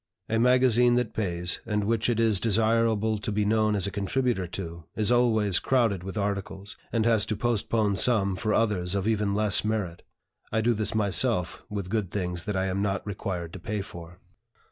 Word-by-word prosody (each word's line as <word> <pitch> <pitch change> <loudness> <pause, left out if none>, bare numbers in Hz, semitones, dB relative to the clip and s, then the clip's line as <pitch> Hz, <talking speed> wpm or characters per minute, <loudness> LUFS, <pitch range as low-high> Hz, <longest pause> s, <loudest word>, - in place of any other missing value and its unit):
A 110 0 +1
magazine 125 -1 +4
that 125 -2 -1
pays, 90 -4 -1
and 105 -2 -1
which 115 +2 0
it 115 -2 0
is 110 -4 +3
desirable 110 0 +1
to 110 +1 -4
be 105 0 0
known 110 0 +2
as 100 - +1
a 100 - -2
contributor 100 -1 -1
to, 85 -2 -7
is 110 +1 0
always 110 -6 +3
crowded 115 -8 +1
with 95 +3 -6
articles, 100 0 -4 0.2
and 115 -2 0
has 115 -3 +3
to 110 - -1
postpone 110 -2 0
some 100 -6 +2
for 110 +3 -2
others 100 -4 0
of 100 +1 -1
even 105 -2 0
less 105 0 +2
merit. 105 -6 -2 0.5
I 110 - +1
do 120 +2 +2
this 110 0 -2
myself 100 -2 +1
with 100 -3 -5
good 105 -5 -1
things 90 -3 -3
that 105 - -2
I 95 - 0
am 95 +1 -1
not 100 -1 -1
required 90 -4 -5
to 95 - -7
pay 105 +4 -3
for. 85 -3 -10
105 Hz, 190 wpm, -27 LUFS, 95-115 Hz, 0.5 s, magazine